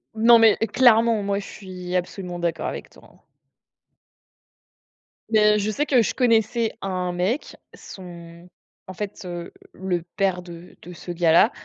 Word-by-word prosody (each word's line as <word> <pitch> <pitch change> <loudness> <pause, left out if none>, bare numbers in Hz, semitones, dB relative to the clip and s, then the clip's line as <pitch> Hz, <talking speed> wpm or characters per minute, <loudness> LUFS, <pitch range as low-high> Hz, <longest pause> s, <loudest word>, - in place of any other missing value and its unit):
Non, 230 +1 +6
mais 225 -1 +5
clairement, 230 -2 +3
moi, 200 0 -1
je 200 - -8
suis 185 -2 -8
absolument 180 0 -4
d'accord 170 -1 -2
avec - - -6
toi, - - -19
hein! - - -25 2.1
Mais 210 -1 +4
je 205 +1 -1
sais 285 +8 -1
que 260 -5 +3
je 225 - -1
connaissais 230 -2 +1
un 185 -2 -3
mec, 185 +10 -2 0.2
son 170 -2 -12 0.4
en 185 - -8
fait, 205 +1 -6
heu, 175 -1 -7 0.2
le 185 -2 -3
père 190 -3 0
de 175 0 -12
de 180 - -11
ce 175 - -8
gars-là, 170 +6 +4
190 Hz, 150 wpm, -23 LUFS, 175-220 Hz, 2.1 s, Non